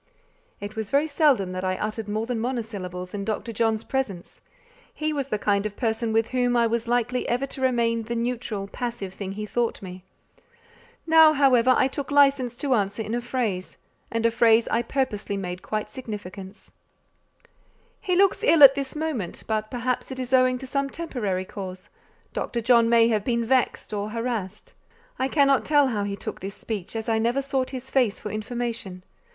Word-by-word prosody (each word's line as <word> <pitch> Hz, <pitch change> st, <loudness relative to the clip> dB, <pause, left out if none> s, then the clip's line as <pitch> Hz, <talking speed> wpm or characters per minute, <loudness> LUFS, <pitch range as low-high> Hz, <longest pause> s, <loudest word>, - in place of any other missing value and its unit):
It 205 Hz, +1 st, -7 dB
was 220 Hz, -2 st, -4 dB
very 285 Hz, +2 st, +3 dB
seldom 285 Hz, -, +2 dB
that 185 Hz, 0 st, -4 dB
I 185 Hz, 0 st, -1 dB
uttered 215 Hz, 0 st, -4 dB
more 215 Hz, +2 st, -1 dB
than 240 Hz, -1 st, -2 dB
monosyllables 205 Hz, -7 st, -4 dB
in 200 Hz, -1 st, -3 dB
Dr. 220 Hz, +3 st, -3 dB
John's 225 Hz, 0 st, 0 dB
presence; 215 Hz, -10 st, -4 dB, 0.5 s
he 310 Hz, 0 st, -2 dB
was 280 Hz, -3 st, -2 dB
the 215 Hz, -, -1 dB
kind 200 Hz, -1 st, +1 dB
of 205 Hz, -, -11 dB
person 225 Hz, -1 st, -1 dB
with 225 Hz, 0 st, +1 dB
whom 245 Hz, -1 st, +1 dB
I 235 Hz, -, +4 dB
was 230 Hz, 0 st, -1 dB
likely 245 Hz, +1 st, 0 dB
ever 245 Hz, +3 st, 0 dB
to 270 Hz, -, -9 dB
remain 235 Hz, -3 st, +1 dB
the 230 Hz, +2 st, -4 dB
neutral, 230 Hz, -4 st, -3 dB
passive 220 Hz, -3 st, -5 dB
thing 195 Hz, -1 st, -6 dB
he 210 Hz, +1 st, -5 dB
thought 235 Hz, +2 st, -1 dB
me. 185 Hz, -1 st, -9 dB, 1.0 s
Now, 320 Hz, -1 st, +7 dB
however, 255 Hz, -3 st, +4 dB
I -, -, +4 dB
took 270 Hz, 0 st, -5 dB
licence 275 Hz, -4 st, +3 dB
to 275 Hz, -1 st, 0 dB
answer 205 Hz, 0 st, 0 dB
in 215 Hz, +1 st, -5 dB
a 240 Hz, -, -1 dB
phrase: 235 Hz, -7 st, -3 dB, 0.3 s
and 230 Hz, 0 st, -1 dB
a 230 Hz, -, +4 dB
phrase 230 Hz, 0 st, +4 dB
I 230 Hz, -, +2 dB
purposely 230 Hz, -5 st, -2 dB
made 180 Hz, -1 st, -5 dB
quite 215 Hz, 0 st, -3 dB
significant. 205 Hz, -5 st, -8 dB, 1.3 s
"He 370 Hz, -4 st, -1 dB
looks 390 Hz, +1 st, +3 dB
ill 320 Hz, -3 st, +6 dB
at 270 Hz, -1 st, +11 dB
this 275 Hz, 0 st, -4 dB
moment; 300 Hz, -, -3 dB
but 215 Hz, -1 st, -2 dB
perhaps 250 Hz, 0 st, -2 dB
it 260 Hz, -1 st, -6 dB
is 255 Hz, 0 st, -4 dB
owing 255 Hz, -1 st, +4 dB
to 265 Hz, -, -8 dB
some 275 Hz, +1 st, -1 dB
temporary 215 Hz, -, -3 dB
cause: 185 Hz, -2 st, -8 dB, 0.4 s
Dr. 240 Hz, -, -2 dB
John 235 Hz, 0 st, +4 dB
may 230 Hz, 0 st, +5 dB
have 215 Hz, -3 st, +1 dB
been 235 Hz, -1 st, 0 dB
vexed 255 Hz, -3 st, 0 dB
or 205 Hz, 0 st, -2 dB
harassed." 220 Hz, -3 st, -4 dB, 0.5 s
I 260 Hz, -, +1 dB
cannot 275 Hz, -1 st, +3 dB
tell 290 Hz, -3 st, +3 dB
how 210 Hz, -4 st, -1 dB
he 200 Hz, 0 st, -3 dB
took -, -, -6 dB
this 195 Hz, +2 st, -6 dB
speech, 210 Hz, -2 st, -6 dB
as 225 Hz, 0 st, -4 dB
I 225 Hz, -1 st, +2 dB
never 240 Hz, +5 st, +1 dB
sought 270 Hz, -2 st, -1 dB
his 265 Hz, 0 st, -7 dB
face 245 Hz, -6 st, +2 dB
for 210 Hz, -, -6 dB
information. 215 Hz, -4 st, -4 dB
230 Hz, 190 wpm, -25 LUFS, 210-260 Hz, 1.3 s, at